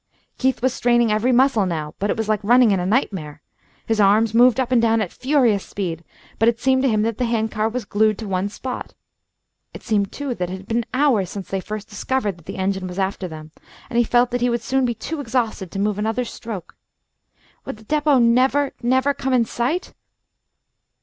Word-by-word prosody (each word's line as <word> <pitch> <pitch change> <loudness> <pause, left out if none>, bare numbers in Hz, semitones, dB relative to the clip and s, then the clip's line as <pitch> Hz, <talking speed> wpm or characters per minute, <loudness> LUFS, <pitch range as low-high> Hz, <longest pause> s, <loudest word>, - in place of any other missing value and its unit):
Keith 260 -2 0
was 260 -1 +2
straining 240 -2 +2
every 215 +4 +2
muscle 245 -5 +3
now, 155 -3 -4
but 205 - -1
it - - 0
was 220 -1 -2
like 215 -2 0
running 240 +1 +5
in 195 - +2
a 180 - -2
nightmare. 180 - -1 0.4
His 225 -1 +1
arms 210 +2 +4
moved 245 +2 +5
up 255 -1 -1
and 245 -2 +4
down 225 0 +3
at 200 -5 -2
a - - -24
furious 250 -7 +2
speed, 170 -4 -5 0.4
but 225 - +5
it 230 0 -2
seemed 260 +1 +2
to 270 - +2
him 215 -2 +1
that 225 -1 -2
the 250 - +1
hand 225 -2 -1
car 215 0 0
was 240 -1 -4
glued 215 0 +2
to 220 - -6
one 190 +1 -1
spot. 255 +4 -7 0.8
It - - -10
seemed, 205 -3 0
too, 285 -3 -4
that 180 -6 -3
it 185 - -5
had 190 +1 -14
been 230 0 -1
hours 255 -9 +2
since 195 -1 -7
they 195 - -1
first 215 +2 -6
discovered 210 -2 -2
that 165 - -21
the - - -6
engine 190 0 -1
was 180 0 -8
after 190 -1 -2
them, 155 -1 -10 0.4
and 235 - +1
he - - +5
felt 240 +1 +2
that 245 0 -1
he 245 - +2
would 235 -1 -1
soon 265 +1 +1
be 240 -1 -1
too 310 +8 -5
exhausted 230 -7 -2
to 195 - -7
move 205 +1 0
another 225 +4 -1
stroke. 220 -5 -8 0.9
Would - - -6
the 220 - -16
depot 295 +3 +2
never 255 +4 +3
never 260 +3 +2
come 265 -1 -2
in 240 -2 +3
sight? 255 +11 -2
225 Hz, 225 wpm, -21 LUFS, 200-250 Hz, 0.9 s, running